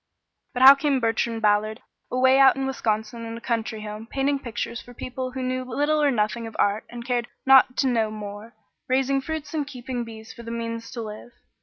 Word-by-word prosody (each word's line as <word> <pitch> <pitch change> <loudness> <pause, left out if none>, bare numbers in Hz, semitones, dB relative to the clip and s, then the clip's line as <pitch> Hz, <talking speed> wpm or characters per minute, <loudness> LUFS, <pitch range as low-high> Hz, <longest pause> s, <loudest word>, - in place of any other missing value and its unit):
But 250 0 +1
how 270 +1 +12
came 280 -1 +1
Bertrand 225 -1 -1
Ballard 215 +2 +2 0.3
away 260 +1 +4
out 270 -1 +7
in 270 - -2
Wisconsin 225 -3 -2
in 230 0 -6
a - - -7
country 225 -2 -3
home, 215 +1 -7
painting 275 +1 0
pictures 235 -1 -5
for 245 - -14
people 255 +1 -5
who 260 -1 -4
knew 255 0 -1
little 290 +5 0
or 290 - +4
nothing 230 -1 -1
of 225 - -10
art, 205 +2 +1
and 240 0 -8
cared 240 -1 -1 0.2
not 265 -1 +6
to 270 - +2
know 225 -3 +1
more, 210 +1 -8 0.3
raising 270 +1 +1
fruits 315 +1 -5
and 295 -3 -1
keeping 250 -2 -5
bees 220 -1 -10
for 235 - -11
the 230 - -8
means 230 0 -4
to 235 - -5
live? 215 +3 -9
240 Hz, 205 wpm, -24 LUFS, 225-265 Hz, 0.3 s, how